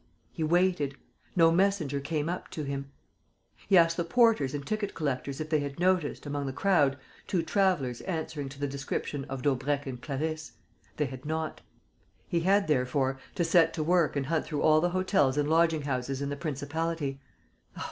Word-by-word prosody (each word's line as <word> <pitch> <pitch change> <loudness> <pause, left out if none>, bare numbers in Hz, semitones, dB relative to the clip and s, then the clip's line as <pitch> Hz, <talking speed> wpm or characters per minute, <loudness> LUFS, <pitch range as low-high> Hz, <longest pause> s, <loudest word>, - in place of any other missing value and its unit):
He 165 - -3
waited. 170 -4 +2 0.4
No 165 -2 +6
messenger 170 -6 +1
came 150 +2 -2
up 180 +2 -4
to 155 - -5
him. 140 -1 -4 0.8
He 195 - +7
asked 165 -1 +5
the 170 - +1
porters 170 - +3
and 140 -1 -5
ticket 215 +1 -2
collectors 140 -2 -2
if 155 0 -5
they 155 - +3
had 140 0 -5
noticed, 180 -5 +1
among 145 -1 -3
the 135 - -3
crowd, 145 -5 +3 0.3
two 175 -4 0
travellers 165 - +1
answering 160 -5 -4
to 135 0 -12
the 145 - 0
description 140 0 -4
of 135 -2 -6
Daubrecq 145 +1 0
and 125 -2 -6
Clarisse. 155 +3 -3 0.4
They 150 - +1
had 130 -1 -7
not. 160 +1 -3 0.7
He 170 - +1
had, 195 +4 +3
therefore, 135 -1 +1 0.2
to 175 - +1
set 165 0 +4
to 155 - -1
work 170 -1 +2
and 140 -1 0
hunt 160 +3 0
through 150 -2 -2
all 155 0 +5
the 175 - +2
hotels 180 -7 +2
and 145 0 +2
lodging 160 -1 +3
houses 135 -1 -2
in 140 0 -2
the 145 - -2
principality. 145 0 -3
150 Hz, 180 wpm, -29 LUFS, 140-170 Hz, 0.8 s, He